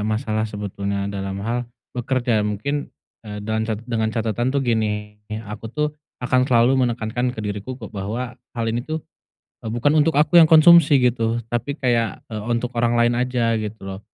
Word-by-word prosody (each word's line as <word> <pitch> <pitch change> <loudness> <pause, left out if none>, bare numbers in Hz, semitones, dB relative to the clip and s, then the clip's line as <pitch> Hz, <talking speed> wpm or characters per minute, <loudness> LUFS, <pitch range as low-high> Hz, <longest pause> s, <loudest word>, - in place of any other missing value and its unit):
masalah 110 0 -1
sebetulnya 100 -1 -3
dalam 100 0 -4
hal 120 +1 -2 0.2
bekerja. 125 -2 0
Mungkin, 110 +8 -2 0.3
eee, 105 -2 -8
dan 110 +1 -1
cet 110 +1 -3
dengan 115 -2 -1
catatan 115 +2 -1
tuh 140 0 0
gini, 105 -3 -1 0.2
aku 105 +2 -7
tuh 150 +5 -1 0.4
akan 130 +1 +2
selalu 125 +1 +4
menekankan 120 +2 -2
ke - - -4
diriku 105 +5 -4
ku 110 -3 -10
bahwa 110 +5 -4 0.2
hal 115 - -1
ini 115 +1 -1
tuh, 155 +4 -5 0.6
eee, - - -2
bukan 145 +6 +2
untuk 155 +2 +3
aku 150 +4 +4
yang 165 - +9
konsumsi 160 -3 +7
gitu 115 -1 +1
tapi 120 +4 -2
kayak, 120 -6 0
eee, 110 -1 -5
untuk 120 +1 -1
orang 120 0 +2
lain 120 0 +3
aja, 125 -2 +1
gitu 110 0 -5
loh. 95 0 -6
115 Hz, 175 wpm, -22 LUFS, 110-125 Hz, 0.6 s, yang